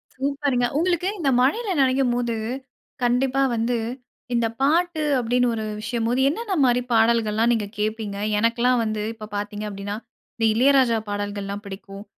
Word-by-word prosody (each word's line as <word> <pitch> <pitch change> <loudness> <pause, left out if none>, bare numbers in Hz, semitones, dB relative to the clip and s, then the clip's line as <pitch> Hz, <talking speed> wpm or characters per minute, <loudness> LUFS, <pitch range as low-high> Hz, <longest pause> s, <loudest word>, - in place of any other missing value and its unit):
சூப்பர்‌ங்க! 275 -2 0
உங்ளுக்கு 350 +2 +1
இந்த 290 -5 +1
மழையில 410 - +1
நனையும்போது 245 -3 +1 0.7
கண்டிப்பா, 255 +2 +2
வந்து 235 +1 0 0.6
இந்த 235 -1 +2
பாட்டு 320 +3 +2 0.2
அப்டின்னு 245 +1 +2
ஒரு 220 - -3 0.2
விஷயம் 225 +1 -2
போது 245 +2 +1
என்னென்ன 410 +6 -3
மாரி 245 0 +3
பாடல்கள்லாம் 225 0 +3
நீங்க 210 -3 -1
கேப்பீங்க? 215 -1 -2 0.2
எனக்கெல்லாம் 235 +2 +2
வந்து 215 -1 -2
இப்போ 220 -1 -9
பாத்தீங்க 205 +1 -4
அப்டினா, 200 0 -5 0.4
இந்த 225 - 0
இளையராஜா 255 -1 +4
பாடல்கள்லாம் 205 0 -4
பிடிக்கும். 195 0 -9
235 Hz, 135 wpm, -23 LUFS, 215-265 Hz, 0.7 s, இளையராஜா